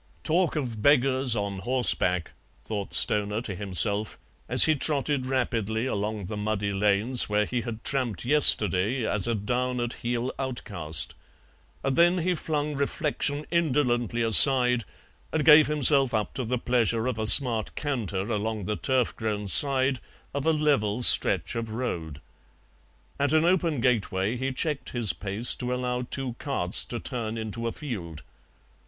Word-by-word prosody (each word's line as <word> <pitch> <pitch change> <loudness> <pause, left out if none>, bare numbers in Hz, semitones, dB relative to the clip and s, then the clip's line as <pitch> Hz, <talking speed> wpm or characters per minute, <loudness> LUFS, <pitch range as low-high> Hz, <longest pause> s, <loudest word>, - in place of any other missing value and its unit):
"Talk 175 +2 0
of 120 -8 -4
beggars 130 -2 +3
on 100 -2 -4
horseback," 95 -6 +1 0.3
thought 105 -3 -6
Stoner 105 0 +1
to 110 -4 -6
himself, 100 +2 -1 0.3
as - - +5
he 155 - +3
trotted 145 -2 -2
rapidly 115 -3 -2
along 105 -4 -4
the 105 - -6
muddy 105 -1 -3
lanes 105 +6 +1
where 105 0 +1
he 120 +3 -3
had 115 -1 -8
tramped 120 -10 -3
yesterday 115 - +3
as 105 0 0
a 115 - -1
down 125 +4 -3
at 120 0 -3
heel 120 +1 -3
outcast; 100 - 0 0.7
and 135 -1 -1
then 175 +2 +3
he 180 +1 -1
flung 150 -3 -3
reflection 145 +1 -2
indolently 125 - 0
aside 125 0 +8 0.5
and 155 -3 -2
gave 155 -1 +7
himself 140 -4 +3
up 105 -1 -3
to 130 - -4
the 125 +3 -2
pleasure 115 -2 0
of 125 -3 -3
a 110 - -2
smart 115 -3 +2
canter 105 -10 -4
along 110 -1 -3
the 105 +2 -3
turf 130 +1 -1
grown 105 -2 -4
side 130 +3 +2 0.3
of 140 +2 -3
a - - +4
level 135 -8 0
stretch - - +4
of 115 -1 -5
road. 85 - -5 1.0
At 140 +1 0
an 155 +1 +3
open 170 -5 0
gateway 105 -3 -1
he 130 +2 -3
checked 145 +2 -3
his 115 -8 0
pace 100 +7 -2
to 125 0 -5
allow 125 0 -3
two 125 0 -5
carts 95 -11 -1
to 120 - -6
turn 115 -4 -5
into 110 +1 -5
a - - -3
field. 85 - -8
120 Hz, 155 wpm, -25 LUFS, 105-135 Hz, 1.0 s, aside